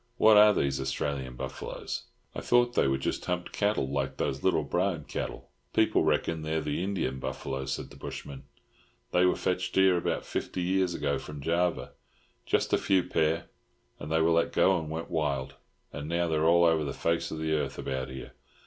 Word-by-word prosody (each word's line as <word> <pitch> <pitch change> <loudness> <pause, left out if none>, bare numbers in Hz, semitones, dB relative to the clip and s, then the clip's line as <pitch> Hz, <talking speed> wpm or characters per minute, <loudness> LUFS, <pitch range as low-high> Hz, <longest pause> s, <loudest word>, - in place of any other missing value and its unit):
What 110 0 +7
are 105 0 +8
these 70 -8 0
Australian 65 -1 -3
buffaloes? - - -5 0.3
I - - -5
thought 120 0 +3
they - - +3
were 65 0 +1
just 65 - -2
humped 90 0 -2
cattle 100 -9 0
like 70 -1 -2
those 70 +1 -2
little - - +2
Brahmin - - -1
cattle." - - -6 0.2
"People - - +3
reckon 80 -1 +1
they're 80 +1 -1
the 75 +2 -2
Indian 90 -9 -2
buffalo," 65 0 -4
said 65 0 -4
the - - -13
bushman. 70 -2 -8 0.7
"They 90 +1 +4
were - - +2
fetched 90 0 -2
here 95 -1 +5
about 85 - -1
fifty 90 - -3
years 95 -1 +1
ago 70 -2 -1
from 75 -1 -8
Java—just 85 +4 -2
a - - +4
few 95 -2 +2
pair, 80 -1 0 0.5
and 75 - -7
they 80 0 +3
were 85 - +3
let 85 0 +2
go 95 -1 +4
and 80 -1 -6
went 80 +1 -5
wild, 70 -4 -1 0.4
and 75 +1 -6
now 85 +1 +1
they're 80 -1 +1
all 85 +1 +5
over 80 -2 +3
the 70 - -3
face 85 0 0
of 80 - -5
the 80 0 -1
earth 75 - -1
about 65 0 -3
here. 65 0 -8
80 Hz, 190 wpm, -29 LUFS, 70-90 Hz, 0.7 s, are